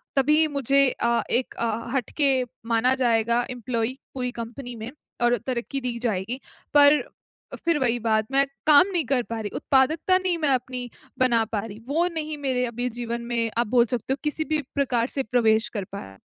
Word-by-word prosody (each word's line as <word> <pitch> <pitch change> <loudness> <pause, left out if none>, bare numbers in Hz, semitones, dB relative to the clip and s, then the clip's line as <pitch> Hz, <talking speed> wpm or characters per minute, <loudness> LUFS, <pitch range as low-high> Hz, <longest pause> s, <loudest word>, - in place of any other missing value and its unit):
तभी 300 +3 +4
मुझे 275 -1 +1
अ, 235 -1 0
एक 245 +2 +1
अ, 230 0 -2
हटके 270 +1 +1 0.2
माना 240 +3 +3
जाएगा, 235 -2 +2
एम्प्लॉयी, 245 0 -2 0.2
पूरी 250 -2 -3
कंपनी 245 +2 -7
में 225 +2 -7 0.3
और 240 0 +3
तरक्की 255 +2 -2
दी 245 -1 -3
जाएगी। 230 +1 -2 0.3
पर 290 0 +7 0.6
फ़िर 335 -2 +2
वही 245 -2 +1
बात, 220 -1 +1
मैं 275 +1 +4 0.2
काम 305 +5 +7
नहीं 330 -6 +1
कर 250 -1 +1
पा 230 -1 -5
रही, 210 -2 -4
उत्पादकता 310 +7 +2
नहीं 370 -2 0
मैं 305 -3 0
अपनी 250 -1 -1 0.3
बना 240 -3 +4
पा 210 - +1
रही, 215 0 -9
वो 330 +5 +1
नहीं 310 -2 -3
मेरे 260 -3 0
अभी 245 +1 -3
जीवन 235 0 -4
में, 235 -1 -1
आप 235 -2 +1
बोल 240 +1 +4
सकते 245 +2 -2
हो, 275 - -4
किसी 305 +1 -2
भी 305 - +2
प्रकार 250 -4 +1
से 270 - +1
प्रवेश 225 0 +2
कर 200 - -2
पाया। 95 - -8
250 Hz, 185 wpm, -24 LUFS, 230-275 Hz, 0.6 s, पर